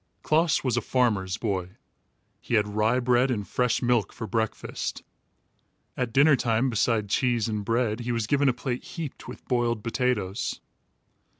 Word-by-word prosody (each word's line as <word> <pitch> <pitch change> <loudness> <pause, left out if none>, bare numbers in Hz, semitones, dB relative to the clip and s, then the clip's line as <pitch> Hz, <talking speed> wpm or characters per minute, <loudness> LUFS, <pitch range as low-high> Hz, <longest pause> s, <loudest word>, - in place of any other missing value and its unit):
Klaas 160 +1 +2
was 125 -3 0
a - - +2
farmer's 105 -7 +1
boy. 95 -4 -3 0.6
He 120 - -2
had 105 -1 +3
rye 110 +4 +1
bread 125 +1 +3
and 105 -5 -2
fresh 125 -1 0
milk 120 -3 +2
for 110 - -6
breakfast. 110 -1 -3 0.9
At 125 -2 -2
dinner 140 +4 +5
time, 120 +1 +1
beside 110 -1 +1
cheese 120 +1 +1
and 105 -2 -2
bread, 115 0 0
he 120 0 -3
was 115 -2 0
given 140 +3 +3
a - - +2
plate 125 0 -4
heaped 160 -5 -7
with - - -10
boiled 120 -3 0
potatoes. 115 -5 -1
120 Hz, 160 wpm, -26 LUFS, 110-125 Hz, 0.9 s, dinner